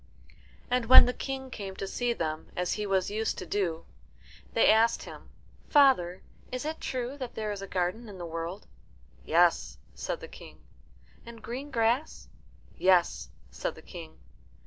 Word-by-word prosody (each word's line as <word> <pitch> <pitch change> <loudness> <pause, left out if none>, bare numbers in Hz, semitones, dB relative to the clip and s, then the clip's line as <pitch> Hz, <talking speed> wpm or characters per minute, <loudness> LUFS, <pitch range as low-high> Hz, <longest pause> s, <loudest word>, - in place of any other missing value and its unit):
And 250 -2 +1
when 260 - +10
the 250 - -1
King 265 -1 -5
came 195 -5 -6
to 195 - -4
see 240 +5 -1
them, 160 -7 -3
as 180 0 0
he 210 -1 -3
was 190 -1 +1
used 220 +1 -1
to 185 - -5
do, 170 -3 -2 0.7
they - - +4
asked 225 +2 +3
him, - - -11 0.4
"Father, 260 - +4 0.3
is 255 +3 -4
it 315 +1 -4
true 255 +2 -3
that 255 -3 -6
there 215 -1 -2
is 200 -1 -5
a 195 - -6
garden 190 +5 -2
in 200 - -9
the 175 - -6
world?" 165 +3 -5 0.6
"Yes," 170 +1 +3 0.2
said - - -4
the - - -9
King. - - -13 0.7
"And 230 -1 -12
green 260 +5 -5
grass?" 240 +4 0 0.5
"Yes," 175 - +3 0.2
said - - -4
the - - -14
King. 80 -1 -10
210 Hz, 165 wpm, -29 LUFS, 180-250 Hz, 0.7 s, when